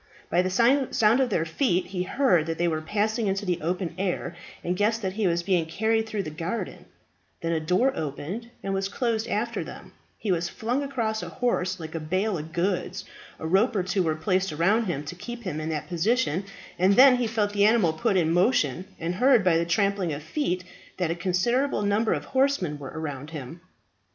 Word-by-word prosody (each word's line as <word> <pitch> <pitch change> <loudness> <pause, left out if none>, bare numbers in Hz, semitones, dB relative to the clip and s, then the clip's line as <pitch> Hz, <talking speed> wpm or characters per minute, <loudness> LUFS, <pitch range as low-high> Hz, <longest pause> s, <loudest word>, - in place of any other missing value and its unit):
By 180 - +4
the 185 - -1
sound 235 +1 +3
of 260 -2 +2
their 165 - +1
feet 180 - +1
he 180 -1 -4
heard 180 - +2
that 165 0 -2
they 175 - +1
were 160 -2 -1
passing 215 +5 0
into 195 +1 -1
the 180 -2 -1
open 175 +2 -2
air, 190 -2 -2 0.3
and 175 +1 -1
guessed 215 +3 +1
that 190 -1 -1
he 210 -1 0
was 170 0 +1
being 175 -3 +1
carried 220 +5 0
through 215 -3 -2
the 155 - -6
garden; 170 +8 -4 0.6
then 165 - -1
a 165 - +1
door 180 +12 +2
opened 160 - -5
and 195 - -2
was 195 0 0
closed 230 0 -1
after 230 +2 -1
them; - - -11 0.2
he 210 - -2
was 175 -1 0
flung 240 +8 -2
across 230 -6 -2
a - - -6
horse 190 -7 -1
like 160 -1 -7
a 165 - -2
bale 185 +7 0
of 155 +2 -8
goods, 180 +2 -1 0.3
a - - -7
rope 195 +8 +3
or 190 - +1
two 185 +1 0
were 160 -3 +1
placed 185 +3 0
around 195 +9 +2
him 165 -7 -2
to 145 - -6
keep 240 +6 -8
him 155 -6 -3
in 155 - -3
that 155 -2 -3
position, 190 - +1 0.3
and 190 +2 +4
then 260 +1 +8
he 245 -2 0
felt 210 -2 0
the 205 0 +4
animal 210 -7 +4
put 195 +5 +1
in 165 -3 +2
motion, 180 - +2
and 165 +1 -2
heard 245 +3 +4
by 180 -2 +4
the 165 +1 +2
trampling 200 -1 +1
of 145 0 -5
feet 180 - -1 0.3
that 175 -3 0
a - - -1
considerable 210 +9 +1
number 205 +2 +2
of 145 -3 -1
horsemen 260 - +1
were 135 -2 -7
around 145 -2 -5
him. 155 +1 -8
185 Hz, 210 wpm, -26 LUFS, 165-220 Hz, 0.6 s, then